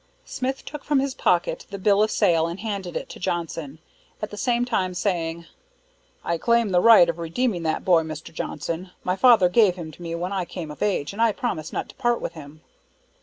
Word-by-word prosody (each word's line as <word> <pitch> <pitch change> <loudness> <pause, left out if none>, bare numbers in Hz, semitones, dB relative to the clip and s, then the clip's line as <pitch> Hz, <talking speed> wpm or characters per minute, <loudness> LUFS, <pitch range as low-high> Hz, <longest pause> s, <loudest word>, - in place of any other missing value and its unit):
Smith 265 +1 -4
took 295 -1 -8
from 295 -2 +2
his 275 0 -1
pocket 175 -7 0
the 200 - -6
bill 200 +1 +3
of 215 - +3
sale 165 -5 +2
and 170 +3 -6
handed 200 -5 -4
it - - -6
to - - -10
Johnson; 165 -4 -3 0.4
at 210 - -5
the - - -6
same 245 +2 +1
time 185 -7 -1
saying, 170 -3 -2 0.8
"I 170 -1 -1
claim 235 0 +2
the 180 -2 +3
right 225 -6 +8
of 170 0 -3
redeeming 175 +4 -1
that 155 - -2
boy, 175 -3 +5
Mr. 160 0 -8
Johnson. 165 +4 -4
My 180 - 0
father 225 -4 +6
gave 190 -1 +4
him 165 -3 -7
to 165 - -16
me 170 -1 -4
when 180 +3 -3
I 190 -2 -1
came 170 -4 -7
of 150 - -12
age, 195 -6 0
and 215 - -4
I 230 -1 +5
promised 190 - -3
not - - -3
to - - -13
part 240 -2 +1
with - - -5
him." 155 -1 -12
180 Hz, 220 wpm, -24 LUFS, 165-225 Hz, 0.8 s, right